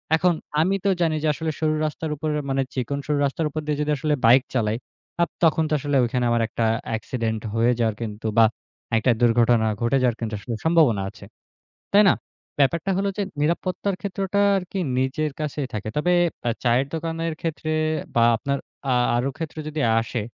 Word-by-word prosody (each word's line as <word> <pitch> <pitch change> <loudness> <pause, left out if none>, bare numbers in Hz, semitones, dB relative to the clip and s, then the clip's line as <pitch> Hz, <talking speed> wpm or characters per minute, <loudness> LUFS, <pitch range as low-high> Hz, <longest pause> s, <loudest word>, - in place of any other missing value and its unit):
এখন 175 +2 +3 0.3
আমি 190 +4 +2
তো 200 - +4
জানি 160 -2 +2
যে, - - +2
আসলে 160 +2 -3
সরু 155 -1 +1
রাস্তার 155 +1 -3
উপরে 150 +1 -2 0.2
মানে, 135 0 +1
চিকন 135 +2 -2
সরু 150 -1 +1
রাস্তার 140 +4 -1
উপর 155 +2 -4
দিয়ে 150 -1 -1
যদি 150 0 0
আসলে 150 +2 0
বাইক 125 +3 +7
চালাই। 110 -3 0 0.4
আ - - +6 0.2
তখন 160 0 +4
তো - - 0
আসলে 145 +1 -1
ওইখানে 125 +1 0
আমার 120 -1 +2
একটা 115 0 -1 0.2
অ্যাক্সিডেন্ট 110 -1 -2
হয়ে 115 +2 +3
যাওয়ার 110 -2 +1
কিন্তু 110 -1 -4
বা 115 - +8 0.5
একটা 120 +3 +3
দুর্ঘটনা 120 -1 +4 0.2
ঘটে 115 +3 +2
যাওয়ার 120 -2 +2
কিন্তু 110 -2 -3
আসলে 115 +3 -5
সম্ভাবনা 155 -11 +4
আছে। - - -13 0.7
তাই 205 +1 +7
না? - - +5 0.5
ব্যাপারটা 170 +7 +2
হলো 200 +1 +1
যে, - - 0 0.2
নিরাপত্তার 185 +4 0
ক্ষেত্রটা 195 +1 -2 0.2
আর 190 - 0
কি 195 - -2 0.2
নিজের 145 +4 -1
কাছেই 150 -2 -3
থাকে। 105 0 -3
তবে 175 +4 +2 0.4
আ - - +3
চায়ের 125 +3 +2
দোকানের 165 0 -2
ক্ষেত্রে 160 -1 -3 0.5
বা 115 - +5
আপনার 140 +3 -1 0.4
আ - - +3 0.2
আরো 125 +3 0
ক্ষেত্রে 160 -1 -5
যদি 155 0 -3 0.2
আসে। 115 +1 -3
140 Hz, 185 wpm, -23 LUFS, 120-160 Hz, 0.7 s, বা